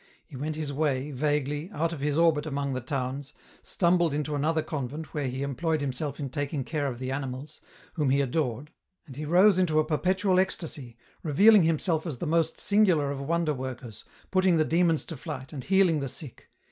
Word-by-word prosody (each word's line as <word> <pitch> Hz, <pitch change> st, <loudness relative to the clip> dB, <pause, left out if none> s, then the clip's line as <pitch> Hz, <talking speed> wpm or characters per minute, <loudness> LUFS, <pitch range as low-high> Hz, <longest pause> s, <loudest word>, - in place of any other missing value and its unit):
He -, -, -13 dB
went 150 Hz, +4 st, -3 dB
his 150 Hz, -2 st, -3 dB
way, 140 Hz, -1 st, 0 dB
vaguely, 145 Hz, +3 st, -1 dB
out 165 Hz, -2 st, -1 dB
of 160 Hz, -, -6 dB
his 145 Hz, +1 st, 0 dB
orbit 160 Hz, -2 st, +3 dB
among 140 Hz, -2 st, -2 dB
the 130 Hz, -, -3 dB
towns, 135 Hz, +2 st, -4 dB, 0.3 s
stumbled 170 Hz, -4 st, +2 dB
into 150 Hz, 0 st, -2 dB
another 155 Hz, +2 st, +1 dB
convent 150 Hz, +2 st, -5 dB
where 145 Hz, -3 st, -1 dB
he 130 Hz, +2 st, -3 dB
employed 155 Hz, +4 st, -1 dB
himself 140 Hz, +1 st, -3 dB
in 140 Hz, -3 st, -4 dB
taking 145 Hz, 0 st, -2 dB
care 145 Hz, +1 st, -2 dB
of 125 Hz, -3 st, -4 dB
the 130 Hz, +1 st, -4 dB
animals, 135 Hz, +2 st, -5 dB, 0.3 s
whom 150 Hz, -4 st, 0 dB
he 135 Hz, +1 st, +3 dB
adored, 140 Hz, 0 st, -1 dB, 0.3 s
and 135 Hz, -5 st, -11 dB
he 150 Hz, +2 st, -5 dB
rose 185 Hz, +4 st, +5 dB
into 165 Hz, -4 st, +2 dB
a 155 Hz, -, +2 dB
perpetual 185 Hz, +4 st, +1 dB
ecstasy, 150 Hz, -10 st, -2 dB, 0.2 s
revealing 200 Hz, +8 st, +6 dB
himself 165 Hz, 0 st, +1 dB
as 150 Hz, -6 st, -4 dB
the -, -, -4 dB
most 165 Hz, 0 st, +1 dB
singular 185 Hz, -9 st, +3 dB
of 140 Hz, -1 st, -4 dB
wonder 165 Hz, +2 st, 0 dB
workers, 125 Hz, -4 st, -7 dB, 0.3 s
putting 185 Hz, -2 st, +3 dB
the 155 Hz, -, +3 dB
demons 165 Hz, -1 st, +2 dB
to 165 Hz, -, -6 dB
flight, 130 Hz, +1 st, -7 dB
and 135 Hz, -4 st, -6 dB
healing 190 Hz, -5 st, +3 dB
the 135 Hz, -2 st, -3 dB
sick. 135 Hz, 0 st, -8 dB
150 Hz, 195 wpm, -27 LUFS, 135-165 Hz, 0.3 s, revealing